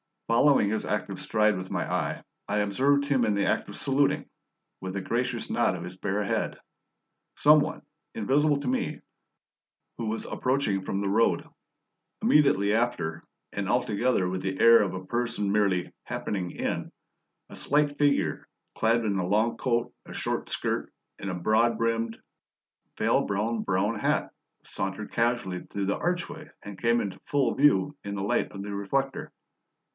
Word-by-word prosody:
Following 115 -2 +4
his 110 +1 -1
active - - -2
stride 105 -2 +2
with 90 0 -6
my - - -1
eye, - - -1 0.2
I 105 +1 0
observed 135 +8 +2
him 135 -4 +2
in 105 -2 +1
the 100 - +1
act - - 0
of - - -8
saluting, 140 +1 +1 0.5
with 95 0 -5
a 100 - -2
gracious 120 +3 -2
nod 120 -5 +2
of 85 - -6
his 90 +1 -8
bare 100 +2 -1
head, 100 - -1 0.8
some 150 +1 +6
one, 145 - -2 0.3
invisible 145 +6 +2
to 140 - -5
me, 130 - -1 1.0
who 115 - -3
was 110 +1 -2
approaching 125 -7 0
from 95 - -2
the 100 - -1
road. 110 +4 +2 0.8
Immediately 105 -9 +4
after 110 -9 0 0.3
and 100 -1 -3
altogether 120 -4 +1
with 95 +1 -3
the 95 0 -3
air 115 0 +8
of 100 - -1
a 95 0 -6
person 115 -2 -1
merely 100 -4 +1
"happening 95 -3 -3
in" - - -3 0.6
a - - -10
slight 145 0 +1
figure, 145 -1 +1 0.3
clad 115 +1 +2
in 100 -2 0
a 90 - -1
long 110 +4 +2
coat, 120 -2 0
a - - -10
short - - -2
skirt, - - -2 0.3
and 100 - -4
a 90 - -2
broad 110 +6 +2
brimmed, 115 0 -1 0.8
veil - - +2
bound 110 +3 -1
brown 100 +4 0
hat, - - 0 0.3
sauntered 95 +2 -4
casually 115 -6 0
through 100 -1 -2
the 100 - -1
archway 170 -3 -3
and 100 -1 -9
came 120 0 +3
into 100 -2 -5
full 140 -2 +1
view 145 -1 +3
in 100 0 -4
the 95 - -3
light 100 - +1
of 100 -1 -7
the 100 0 -5
reflector. 135 +8 -2
110 Hz, 165 wpm, -27 LUFS, 100-125 Hz, 1.0 s, air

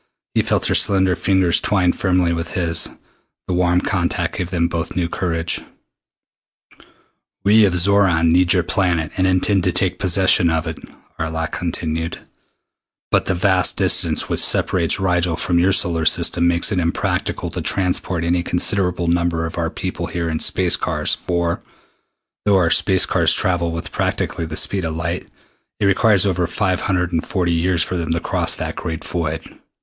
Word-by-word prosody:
He - - +2
felt - - -1
her - - +1
slender 95 -3 +3
fingers 95 0 +2
twine 90 -4 +1
firmly 90 -2 0
with 85 0 -5
his. 85 -2 0 0.6
The 95 - -2
warm 90 0 +2
contact - - -2
gave 90 - -3
them 85 -2 0
both 85 -1 -4
new 85 -1 0
courage. 85 -1 -2 1.8
"We 105 +1 +5
of 95 -3 0
Xoran 90 -3 +3
need 90 0 +3
your 90 -2 +2
planet 85 -4 0
and 95 0 +1
intend 95 +1 +1
to - - +2
take - - -1
possession 95 -1 +3
of 80 0 -1
it," 80 -2 -6 0.4
Arlok 80 0 -3
continued, 80 -1 -3 0.9
"but - - +2
the 95 - 0
vast 95 0 +2
distance - - +2
which - - -1
separates 85 -3 +3
Rigel 90 -3 +1
from 85 +1 0
your 90 +3 +3
solar 90 -4 0
system 85 +1 +2
makes 85 +4 +2
it 95 - 0
impracticable 85 -1 -2
to - - -4
transport 90 -2 -1
any 85 +1 +1
considerable 90 0 0
number 85 -1 0
of 80 - -6
our - - -1
people - - -5
here 85 -1 -3
in 80 -1 -2
space - - +3
cars - - -1
for, 85 -1 -2 0.8
though 100 -2 +4
our 85 -3 +2
space 95 +3 +4
cars - - +2
travel 85 -2 0
with 85 0 -6
practically 85 - -2
the 80 0 -4
speed 95 -2 0
of 80 -1 -3
light, 85 +2 -4 0.5
it - - 0
requires 100 0 +3
over 90 -3 0
five 95 +1 -1
hundred 90 -3 -1
and 80 - 0
forty 90 -3 -1
years 85 +1 +1
for 90 - -4
them 85 -2 -4
to 85 - 0
cross - - 0
that - - -5
great 80 -2 -5
void. 80 -2 -5
85 Hz, 170 wpm, -19 LUFS, 85-95 Hz, 1.8 s, We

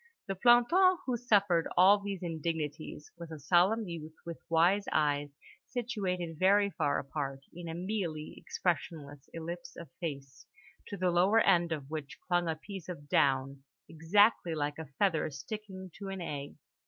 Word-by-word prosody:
The 195 - -2
planton 245 - +5
who 255 - 0
suffered 200 -8 +2
all 195 +3 +7
these 200 -2 -5
indignities 155 -2 -4
was 170 -1 -8
a 160 - -7
solemn 185 +9 +3
youth 160 -2 -7
with 170 -1 -6
wise 175 +5 +3
eyes 145 -1 +1 0.4
situated 190 -9 -3
very 200 +2 +4
far 145 - 0
apart 135 -1 -4
in 175 0 -8
a 165 - -5
mealy 175 -5 -3
expressionless 145 -5 -3
ellipse 170 +1 -7
of 165 -5 -10
face, 140 -5 -6 0.4
to 200 - -6
the 180 -1 +1
lower 185 +6 +4
end 175 -3 +3
of 145 -3 -4
which 155 0 -5
clung 175 -1 +1
a 160 - 0
piece 185 +2 -9
of 145 -5 -7
down, 135 0 +2 0.2
exactly 170 +2 +3
like 150 0 -2
a 160 - -6
feather 175 -7 +2
sticking 190 +5 -8
to 200 - -6
an 195 0 -5
egg. 145 -5 -5
170 Hz, 155 wpm, -31 LUFS, 155-195 Hz, 0.4 s, all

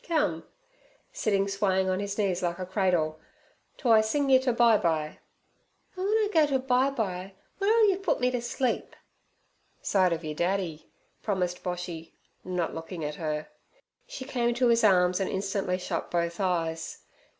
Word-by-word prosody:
Come' 295 - 0 0.7
sitting 200 -2 +1
swaying 195 -1 +1
his 200 0 -4
knees 195 -4 0
like 175 -1 -1
a 185 - -4
cradle, 180 -5 0 0.6
'to 245 - +1
I 220 -1 +7
sing 275 +5 0
yer 260 - +7
ter 260 -1 +1
bye 235 -2 +5
bye.' 155 -2 -1 0.8
'An' 370 - -4
w'en 425 +2 +3
I 430 -1 +2
go 315 -2 +5
to 275 -2 +1
bye 260 +1 +2
bye, 195 -7 -3 0.3
w'ere'll 435 +2 +4
yer 385 -2 +2
put 390 - 0
me 250 0 +2
t' 250 - -1
sleep?' 240 +1 -2 0.9
'Side 185 -3 +3
ov 165 0 -2
yer 155 - -3
daddy' 175 -1 -2 0.3
promised 180 -4 -1
Boshy, 175 -2 -5 0.3
not 180 -2 -2
looking 165 0 -6
at 150 - -3
her. 155 -1 -3 0.6
She 260 - -7
came 240 -3 0
to 245 0 +3
his 230 0 +3
arms 180 -3 +4
and 195 - -1
instantly 195 -1 -1
shut 180 - -4
both 170 -1 -1
eyes. 165 -4 -2
195 Hz, 165 wpm, -28 LUFS, 175-245 Hz, 0.9 s, I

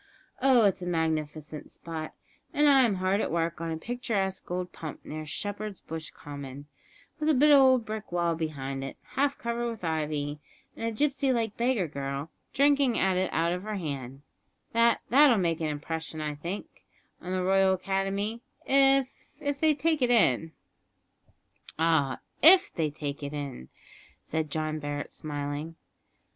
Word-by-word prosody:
Oh! 255 -4 +5
it's 195 -1 +2
a 180 - -4
magnificent 155 -2 -2
spot, 160 -2 -7 0.4
and 295 0 +4
I'm 260 -7 +5
hard 185 +3 +1
at - - -1
work 165 0 -1
on 165 - -2
a 160 - -2
picturesque 200 -2 -2
old 180 0 -3
pump 155 -3 -8
near 155 0 -6
Shepherd's 205 +4 -4
Bush 160 -1 -7
Common, 140 -1 -9 0.5
with 305 0 +1
a 310 - +4
bit 295 +4 +5
of 285 - +9
old 260 -3 +5
brick 215 -2 -6
wall 170 -1 +1
behind 140 -4 -4
it, 135 - -6
half 280 +1 0
covered 235 0 -2
with 225 -4 -7
ivy, 150 -2 -2 0.4
and 230 - -3
a - - -1
gipsy 275 +2 +1
like 225 -4 0
beggar 235 -6 +1
girl 140 +1 -4 0.2
drinking 280 -3 +3
at 190 -1 +2
it 185 +1 0
out 165 +2 +1
of 180 - -3
her 215 +1 -4
hand; 140 -6 -5 0.5
that 230 0 +4
that'll 270 -2 +6
make 170 -3 0
an 160 - 0
impression, 160 +2 -4
I 150 -1 -2
think, 170 +7 -7 0.4
on 180 - -6
the 185 0 0
Royal 190 0 +4
Academy, 195 +4 -2 0.2
if 270 -1 +4 0.3
if 285 -1 -2
they 310 -1 +4
take 315 +1 +1
it 250 - +3
in." 165 - +3 1.3
"Ah! 160 -5 +2 0.2
if 375 +6 +7
they 160 -3 0
take 145 -1 -5
it 140 0 -5
in," 140 - -6 0.5
said 160 -1 -2
John 155 +1 -2
Barret, 145 0 -4
smiling. 145 +2 -4
180 Hz, 165 wpm, -28 LUFS, 155-235 Hz, 1.3 s, of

